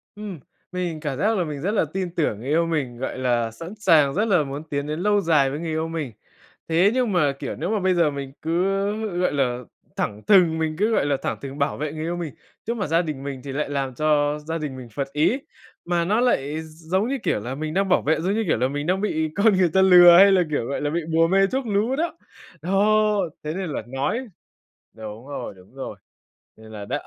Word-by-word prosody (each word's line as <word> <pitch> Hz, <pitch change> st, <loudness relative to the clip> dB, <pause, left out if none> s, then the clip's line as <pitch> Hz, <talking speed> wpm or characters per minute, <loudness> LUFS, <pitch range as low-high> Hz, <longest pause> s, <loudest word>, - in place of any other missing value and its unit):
Ừm, 205 Hz, -6 st, -7 dB, 0.3 s
mình 175 Hz, -3 st, -3 dB
cảm 145 Hz, -4 st, -4 dB
giác 215 Hz, +6 st, +1 dB
là 180 Hz, -, +1 dB
mình 150 Hz, -4 st, -5 dB
rất 190 Hz, +6 st, 0 dB
là 210 Hz, -, +2 dB
tin 185 Hz, -2 st, -3 dB
tưởng 130 Hz, -10 st, 0 dB
người 125 Hz, -, -8 dB
yêu 165 Hz, +3 st, +3 dB
mình, 145 Hz, -7 st, -2 dB
gọi 130 Hz, +1 st, -4 dB
là, 120 Hz, -3 st, 0 dB
sẵn 165 Hz, -, -9 dB
sàng 155 Hz, -8 st, +4 dB
rất 210 Hz, +7 st, +1 dB
là 180 Hz, -8 st, +3 dB
muốn 140 Hz, +2 st, -6 dB
tiến 140 Hz, 0 st, -2 dB
đến 155 Hz, +1 st, -3 dB
lâu 205 Hz, +2 st, +2 dB
dài 155 Hz, -6 st, +3 dB
với 145 Hz, +3 st, -4 dB
người 165 Hz, -, -4 dB
yêu 160 Hz, +1 st, -1 dB
mình. 160 Hz, -6 st, -4 dB, 0.6 s
Thế 175 Hz, +5 st, +4 dB
nhưng 250 Hz, -4 st, +1 dB
mà, 155 Hz, -7 st, +3 dB
kiểu, -, -, -4 dB
nếu -, -, -3 dB
mà 215 Hz, -1 st, +1 dB
bây 185 Hz, 0 st, +2 dB
giờ 170 Hz, -4 st, +2 dB
mình 140 Hz, -1 st, -6 dB
cứ, 165 Hz, +3 st, 0 dB, 0.6 s
gọi 180 Hz, -, +2 dB
là, 125 Hz, -3 st, 0 dB, 0.4 s
thẳng 105 Hz, +1 st, -3 dB
thừng, 175 Hz, -6 st, +5 dB
mình 155 Hz, -1 st, -1 dB
cứ, 210 Hz, +5 st, +1 dB
gọi 220 Hz, -, +2 dB
là, 145 Hz, -2 st, +1 dB
thẳng -, -, -2 dB
thừng 140 Hz, 0 st, -7 dB
bảo 140 Hz, 0 st, 0 dB
vệ 150 Hz, 0 st, -3 dB
người 155 Hz, -, -6 dB
yêu 170 Hz, +2 st, -2 dB
mình 165 Hz, -6 st, -5 dB, 0.3 s
trước 235 Hz, -, 0 dB
mặt 200 Hz, -7 st, -2 dB
gia 165 Hz, +2 st, +3 dB
đình 150 Hz, -5 st, -5 dB
mình 140 Hz, -2 st, -5 dB
thì 140 Hz, -, -6 dB
lại 145 Hz, +1 st, -2 dB
làm 135 Hz, -3 st, -2 dB
cho 150 Hz, 0 st, +1 dB
gia 165 Hz, 0 st, -2 dB
đình 150 Hz, -4 st, -5 dB
mình 125 Hz, -2 st, -9 dB
phật 135 Hz, +5 st, -3 dB
ý. 155 Hz, -, +2 dB, 0.5 s
Mà 170 Hz, -1 st, 0 dB
nó 210 Hz, +6 st, +2 dB
lại 155 Hz, -, 0 dB
giống 165 Hz, +7 st, -2 dB
như 275 Hz, -, -1 dB
kiểu -, -, +1 dB
là 120 Hz, +5 st, -5 dB
mình 155 Hz, +2 st, -4 dB
đang 195 Hz, 0 st, +1 dB
bảo 180 Hz, -, +4 dB
vệ 155 Hz, +2 st, +1 dB
giống 185 Hz, +4 st, 0 dB
như 225 Hz, +1 st, 0 dB
kiểu 155 Hz, -, +2 dB
là 125 Hz, -, +1 dB
mình 145 Hz, +3 st, -4 dB
đang 190 Hz, +2 st, +1 dB
bị 160 Hz, -6 st, 0 dB
con 210 Hz, +1 st, +4 dB
người 180 Hz, -2 st, +3 dB
ta 190 Hz, -, +5 dB
lừa 175 Hz, -2 st, +8 dB
hay 195 Hz, +2 st, +8 dB
là, 190 Hz, -, +4 dB
kiểu, 145 Hz, -6 st, -1 dB
gọi 140 Hz, -, -3 dB
là, 145 Hz, -, 0 dB
bị 170 Hz, +3 st, -1 dB
bùa 165 Hz, +1 st, +4 dB
mê 195 Hz, +2 st, +3 dB
thuốc 260 Hz, +3 st, -2 dB
lú 215 Hz, +5 st, +1 dB
đó. 330 Hz, +2 st, -2 dB, 0.4 s
Đó, 210 Hz, +4 st, +2 dB, 0.3 s
thế 150 Hz, -, -3 dB
nên 185 Hz, -1 st, -4 dB
là 145 Hz, -, -3 dB
nói 140 Hz, -, -2 dB, 0.7 s
đúng 110 Hz, +3 st, -9 dB
rồi, 145 Hz, -, -6 dB
đúng 95 Hz, +6 st, -19 dB
rồi. 135 Hz, -, -6 dB, 0.6 s
Nên 110 Hz, 0 st, -14 dB
là 105 Hz, -2 st, -7 dB
đ -, -, -7 dB
160 Hz, 250 wpm, -23 LUFS, 140-190 Hz, 0.7 s, lừa